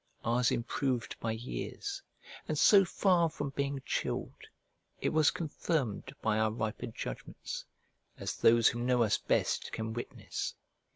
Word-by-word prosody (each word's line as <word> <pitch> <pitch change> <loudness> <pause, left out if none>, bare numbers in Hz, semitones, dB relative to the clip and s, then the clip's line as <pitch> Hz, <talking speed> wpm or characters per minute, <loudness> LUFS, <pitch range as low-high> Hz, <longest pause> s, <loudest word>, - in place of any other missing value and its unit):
Ours 120 +1 +3
improved 125 +1 -1
by 115 - -1
years; 390 - -5 0.5
and - - -1
so 200 -2 +7
far 175 -2 +3
from 145 -3 -4
being 140 -1 -2
chilled, - - -3 0.5
it - - +1
was 155 -1 +4
confirmed 145 - -2
by 110 -1 +2
our 110 0 +3
riper 110 +1 -3
judgments, 115 - -6 0.5
as - - -3
those 115 0 +6
who 120 - -4
know 125 0 +3
us 110 - +2
best - - 0
can 110 0 -3
witness. 120 - -4
125 Hz, 135 wpm, -32 LUFS, 115-155 Hz, 0.5 s, so